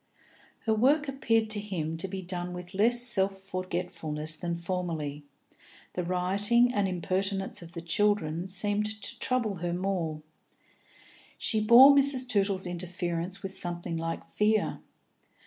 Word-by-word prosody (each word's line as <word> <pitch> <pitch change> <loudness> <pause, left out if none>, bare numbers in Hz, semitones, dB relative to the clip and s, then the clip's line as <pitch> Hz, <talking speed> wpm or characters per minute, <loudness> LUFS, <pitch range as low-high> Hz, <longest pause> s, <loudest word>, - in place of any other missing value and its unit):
Her 220 - +2
work 285 +7 +2
appeared 225 -5 0
to 210 - +1
him 170 -6 -4
to 170 - -2
be 190 0 -6
done 180 0 -5
with 180 +1 -9
less 235 +5 +4
self 195 -5 +3
forgetfulness 180 -5 -3
than 170 +1 -4
formerly; 165 -5 -4 0.7
the 180 - -3
rioting 200 +7 +1
and 205 -4 +1
impertinence 195 +2 -2
of 170 0 -12
the 170 - -6
children 170 -1 0
seemed 205 +2 +2
to - - -4
trouble 235 -6 0
her 175 0 -3
more; 175 -4 -3 1.1
she 220 -2 0
bore 255 +6 +8
Mrs. 275 -2 +4
Tootle's 195 -4 +1
interference 175 +1 -4
with 195 0 -2
something 175 -1 0
like 165 0 -4
fear. 215 +1 0
190 Hz, 135 wpm, -28 LUFS, 175-210 Hz, 1.1 s, bore